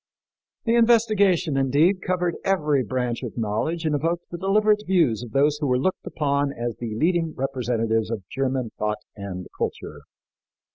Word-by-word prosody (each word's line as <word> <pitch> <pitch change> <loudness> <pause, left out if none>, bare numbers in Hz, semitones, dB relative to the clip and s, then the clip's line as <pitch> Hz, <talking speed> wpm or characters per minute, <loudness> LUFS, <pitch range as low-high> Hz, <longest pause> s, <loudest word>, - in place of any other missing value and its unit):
The 230 - +2
investigation, 215 -8 +3
indeed, 150 +8 +3
covered 180 -1 0
every 150 -8 +2
branch 125 0 -2
of 125 -3 -6
knowledge 115 +10 -1
and 155 - +1
evoked 165 +4 -1
the 175 - -4
deliberate 210 +2 +3
views 165 - +2
of 120 - -7
those 145 +5 +2
who 150 - -1
were 125 -1 +2
looked 185 +9 -1
upon 140 -1 0
as 120 -2 -4
the 115 -3 -5
leading 165 +4 +1
representatives 120 -4 -1
of 105 -6 -5
German 130 -3 -2
thought 105 0 -2
and 95 -3 -6
culture. - - -4
140 Hz, 155 wpm, -24 LUFS, 120-175 Hz, -, investigation